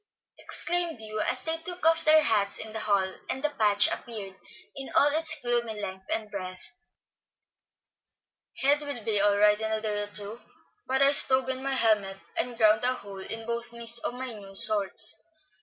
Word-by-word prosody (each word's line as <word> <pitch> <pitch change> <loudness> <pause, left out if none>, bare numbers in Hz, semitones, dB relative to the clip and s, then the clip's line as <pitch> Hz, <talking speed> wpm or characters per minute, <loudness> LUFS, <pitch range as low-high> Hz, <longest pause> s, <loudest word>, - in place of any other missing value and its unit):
exclaimed 345 -5 -1
Hugh, 215 -1 -5
as 255 - -3
they 325 0 -1
took 355 +1 -4
off 325 0 +4
their 310 0 +5
hats 205 -6 +1
in 220 0 -8
the 220 - -4
hall, 200 -3 0 0.2
and 265 - -4
the 300 - 0
patch 210 -5 +3
appeared 210 -5 -6 0.4
in 270 -1 -7
all 290 - +5
its 315 +2 0
gloomy 235 -3 -1
length 190 -1 -7
and 215 -2 -3
breadth. 185 0 -8 1.9
"Head 290 +2 +3
will 285 -6 -6
be 210 -2 0
all 205 0 +3
right 210 +1 +3
in 220 0 -2
a 220 - -1
day 210 -1 -3
or 205 - -5
two, 205 +2 -7 0.5
but 265 +1 +2
I 275 - +5
stove 260 -2 +4
in 260 0 -3
my 270 0 -1
helmet, 215 -5 +2 0.2
and 245 -2 -3
ground 215 0 +4
a 255 +1 +2
hole 200 -4 -10
in 225 +3 -7
both 235 0 -4
knees 235 0 +4
of 245 - -4
my 255 -1 -6
new 195 -2 -12
shorts. 215 -1 +3
225 Hz, 190 wpm, -27 LUFS, 205-265 Hz, 1.9 s, their